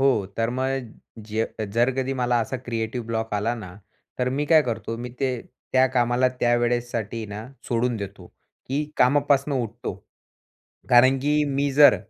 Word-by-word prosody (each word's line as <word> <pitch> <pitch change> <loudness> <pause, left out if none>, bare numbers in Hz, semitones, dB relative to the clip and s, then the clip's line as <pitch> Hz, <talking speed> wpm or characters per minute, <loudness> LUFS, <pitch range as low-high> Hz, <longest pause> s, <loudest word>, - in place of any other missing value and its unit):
हो, 130 -8 +3
तर 115 +1 +1
मग 130 -2 -2 0.3
जे 110 +1 -1 0.3
जर 120 +3 +3
कधी 130 0 0
मला 125 -1 +1
असा 115 +3 -2
क्रिएटिव्ह 115 0 -4
ब्लॉक 115 -1 -2
आला 105 +4 0
ना, 100 -6 -9 0.4
तर 125 0 +1
मी 145 +3 -1
काय 160 0 +6
करतो, 115 -2 -3
मी 125 +1 -6
ते 135 -1 +2 0.4
त्या 130 0 +5
कामाला 120 +1 +3
त्या 120 0 +4
वेळेसाठी 120 -2 -1
ना 105 +3 -7 0.2
सोडून 120 0 +1
देतो, 100 -3 -7 0.4
की 140 +3 -1
कामापासनं 140 +2 +3
उठतो. 115 +1 -5 1.0
कारण 130 +2 +6
की 150 +2 +2
मी 140 0 0
जर 145 +1 +7
120 Hz, 160 wpm, -24 LUFS, 115-135 Hz, 1.0 s, जर